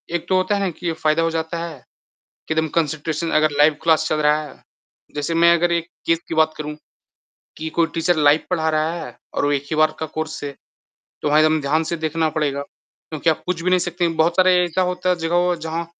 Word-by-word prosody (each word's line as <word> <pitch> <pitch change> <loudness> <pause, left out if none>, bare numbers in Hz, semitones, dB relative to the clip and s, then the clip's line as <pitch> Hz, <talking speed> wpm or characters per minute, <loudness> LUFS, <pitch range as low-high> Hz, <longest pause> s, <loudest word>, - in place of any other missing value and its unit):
एक 170 - -2
तो 185 - +3
होता 195 +2 +1
है 185 - 0
कि 175 - -12
ये 165 - 0
फ़ायदा 155 0 +1
हो 165 - +1
जाता 160 +1 -3
है 160 -4 -8 0.7
कि 160 - 0
एकदम 160 0 +1
कॉन्सन्ट्रेशन 160 +1 -1
अगर 155 -1 +2
लाइव 150 +1 +5
क्लास 160 -1 +3
चल 155 - +1
रहा 150 +1 +3
है। 145 - -13 0.5
जैसे 145 +3 -2
मैं 170 +1 +5
अगर 175 +1 +1
एक 170 0 0 0.2
केस 165 0 +2
की 165 - -4
बात 155 0 +3
करूँ 150 0 -5 0.8
कि 160 0 -4
कोई 165 - +5
टीचर 165 +1 +1
लाइव 150 +1 +4
पढ़ा 160 -3 +1
रहा 155 +1 0
है - - -11 0.2
और - - 0
वो 145 - +2
एक 140 0 -1
ही 155 - -1
बार 155 0 +3
का 160 - -2
कोर्स 160 -1 -4
है। 140 -1 -5 0.7
तो 150 - 0
वहाँ 150 +1 +4
एकदम 155 0 +3
ध्यान 150 +3 +1
से 170 +2 -3
देखना 160 0 -1
पड़ेगा, 140 -2 -1
क्योंकि 155 +2 -4
आप 155 - -2
पूछ 175 -2 -2
भी 185 - +1
नहीं 185 - +4
सकते। 175 0 0
बहुत 170 +2 0
सारे 185 -1 +5
ऐसा 175 +2 0
होता 180 0 -3
है 180 - +2
जगह 175 +1 +2
जहाँ 165 +1 -3
160 Hz, 235 wpm, -21 LUFS, 155-170 Hz, 0.8 s, लाइव